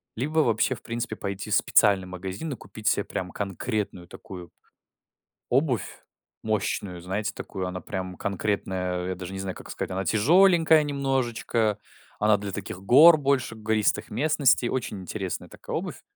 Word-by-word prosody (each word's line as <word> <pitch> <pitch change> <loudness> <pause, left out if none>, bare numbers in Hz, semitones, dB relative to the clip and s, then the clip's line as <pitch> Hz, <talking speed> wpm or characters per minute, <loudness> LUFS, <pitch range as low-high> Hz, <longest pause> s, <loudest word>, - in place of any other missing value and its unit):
Либо 150 +7 0
вообще 120 -1 +2
в - - -16
принципе 115 -1 -4
пойти 100 +1 -5
в - - +3
специальный 100 -3 +4
магазин 95 - -5
и - - -5
купить 105 +1 -9
себе 100 - +3
прям 90 -1 -5
конкретную 100 -2 -3
такую 95 -3 -10 1.0
обувь, 125 - 0 0.4
мощную, 100 -4 -2
знаете, 100 +4 -3
такую, 95 -2 -5
она 90 -1 -5
прям 95 0 -5
конкретная, 95 -2 -2
я 95 - -2
даже 90 +1 -7
не 95 - -5
знаю, 95 -1 -4
как - - -11
сказать. - - -4
Она 95 0 -2
тяжеленькая 160 - +5
немножечко, 125 -6 0 0.4
она 105 0 +4
для 100 -1 -5
таких 95 - -6
гор 155 +10 +8
больше, 135 -5 0
гористых 110 -1 0
местностей. 130 0 +2
Очень 105 -6 -3
интересная 95 0 -5
такая - - -7
обувь. - - -4
105 Hz, 150 wpm, -26 LUFS, 95-125 Hz, 1.0 s, гор